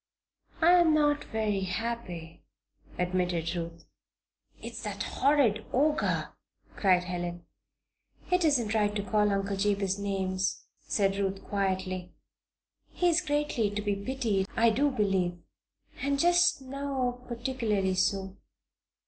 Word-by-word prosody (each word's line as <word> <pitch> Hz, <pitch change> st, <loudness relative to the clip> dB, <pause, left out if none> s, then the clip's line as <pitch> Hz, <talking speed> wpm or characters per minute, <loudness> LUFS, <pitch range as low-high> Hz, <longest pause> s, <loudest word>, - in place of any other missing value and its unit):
"I 330 Hz, +2 st, +6 dB
am 325 Hz, -3 st, +5 dB
not 295 Hz, -1 st, +2 dB
very 215 Hz, -2 st, -1 dB
happy," 180 Hz, -4 st, -4 dB, 0.6 s
admitted 180 Hz, -2 st, -1 dB
Ruth. 170 Hz, -1 st, -6 dB, 0.7 s
"It's -, -, -7 dB
that -, -, -4 dB
horrid 270 Hz, -7 st, +2 dB
Ogre!" 295 Hz, +4 st, +1 dB, 0.5 s
cried 185 Hz, -3 st, +3 dB
Helen. 175 Hz, -1 st, -4 dB, 0.9 s
"It 360 Hz, 0 st, +3 dB
isn't 245 Hz, -9 st, +2 dB
right 210 Hz, -1 st, +1 dB
to 205 Hz, -, -1 dB
call 210 Hz, 0 st, +2 dB
Uncle 200 Hz, 0 st, -1 dB
Jabez 200 Hz, -1 st, 0 dB
names," 190 Hz, -1 st, -1 dB, 0.2 s
said 195 Hz, -1 st, +1 dB
Ruth, 195 Hz, -1 st, -2 dB
quietly. 185 Hz, -2 st, -2 dB, 0.7 s
"He 355 Hz, -, +1 dB
is 340 Hz, +1 st, +3 dB
greatly 290 Hz, -, 0 dB
to 205 Hz, +1 st, -3 dB
be 205 Hz, -1 st, 0 dB
pitied, 205 Hz, -3 st, -1 dB
I 230 Hz, 0 st, +5 dB
do 280 Hz, +6 st, +2 dB
believe. 195 Hz, -7 st, 0 dB, 0.6 s
And 280 Hz, 0 st, +1 dB
just 350 Hz, -3 st, +4 dB
now, 260 Hz, -2 st, -3 dB
particularly 230 Hz, -6 st, -1 dB
so." 190 Hz, +1 st, 0 dB
205 Hz, 120 wpm, -29 LUFS, 190-265 Hz, 0.9 s, I